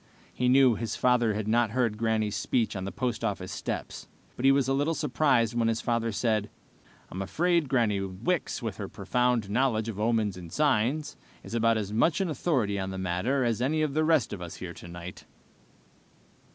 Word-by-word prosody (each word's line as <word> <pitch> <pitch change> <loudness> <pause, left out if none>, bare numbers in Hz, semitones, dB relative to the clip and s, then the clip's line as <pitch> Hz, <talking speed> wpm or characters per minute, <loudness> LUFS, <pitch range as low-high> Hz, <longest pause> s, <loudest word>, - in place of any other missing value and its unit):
He 125 0 +1
knew 130 -1 +6
his 115 0 -3
father 120 -4 +2
had 105 0 -3
not 115 0 +3
heard 120 -1 0
Granny's 110 -2 0
speech 115 +3 0
on 95 -1 -4
the 100 - -4
post 125 -3 -3
office 95 -4 -2
steps, - - -5 0.3
but 125 - -3
he 135 - +7
was 135 -2 +2
little 145 +4 +1
surprised 135 -6 +2
when 115 -1 +1
his 115 0 0
father 115 -1 0
said, 110 0 0 0.6
"I'm 95 - -4
afraid 170 - +1
Granny 115 -7 +2
Wicks, 105 - -2
with 110 -4 -4
her 100 - -5
profound 120 +2 0
knowledge 115 -2 +1
of 105 -2 -6
omens 110 -3 +1
and 85 -2 -10
signs, 145 - +1 0.3
is - - -9
about 115 -1 +3
as 105 -1 -3
much 130 +8 +2
an 190 -4 0
authority 125 - 0
on 95 0 -3
this 95 0 -5
matter 95 +10 0
as 115 -1 0
any 155 +5 +1
of 150 -3 -1
the 155 +2 +2
rest 155 -9 +2
of 95 - -6
us 85 -1 -7
here 90 -2 -7
tonight!" 85 +1 -10
115 Hz, 190 wpm, -28 LUFS, 105-130 Hz, 0.6 s, he